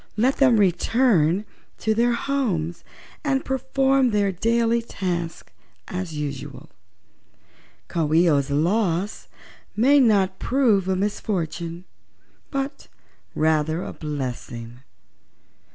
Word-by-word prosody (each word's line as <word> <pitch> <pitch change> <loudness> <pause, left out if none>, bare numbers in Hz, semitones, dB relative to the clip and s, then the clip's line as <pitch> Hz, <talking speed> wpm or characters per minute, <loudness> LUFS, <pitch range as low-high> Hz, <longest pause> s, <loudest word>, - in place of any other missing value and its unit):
Let 255 +5 +2
them 255 -5 +5
return 195 - +2 0.3
to 220 - 0
their 240 +2 +2
homes 205 - -2 0.4
and 270 -3 0
perform 265 0 +2
their 205 -3 +1
daily 230 +4 +1
tasks 175 -7 -4 0.3
as 180 -3 -5
usual. 145 -2 -6 1.2
Coo 160 -3 -1
ee 170 +3 +5
oh's 140 -3 +2
loss 180 +5 0 0.5
may 275 +6 +5
not 200 -6 +3
prove 230 -8 +2
a 190 - +1
misfortune, 175 -3 -3 0.6
but 275 0 -4 0.5
rather 155 +1 +1
a - - -6
blessing." 125 -5 -6
195 Hz, 100 wpm, -23 LUFS, 165-235 Hz, 1.2 s, them